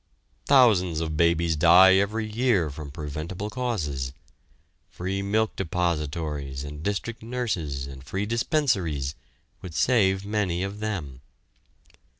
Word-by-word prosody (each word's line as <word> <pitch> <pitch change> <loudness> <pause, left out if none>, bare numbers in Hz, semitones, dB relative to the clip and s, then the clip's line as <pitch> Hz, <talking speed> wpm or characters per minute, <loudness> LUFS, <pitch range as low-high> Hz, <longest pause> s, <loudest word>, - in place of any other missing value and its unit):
Thousands 105 - +5
of 80 -1 -3
babies 85 0 +2
die 90 +4 +7
every 105 +3 0
year 110 - +1
from 75 0 -8
preventable 80 +7 -5
causes. 75 - -2 0.8
Free 95 +2 -3
milk 110 +2 0
depositories 75 -5 -2
and 75 +1 -7
district 105 +5 -3
nurses 105 - -3
and 65 -1 -10
free 95 +8 -3
dispensaries 105 - 0 0.5
would 85 -3 -8
save 95 -1 +2
many 100 -4 -1
of 100 +2 -5
them. 80 -12 -4
90 Hz, 115 wpm, -26 LUFS, 75-105 Hz, 0.8 s, die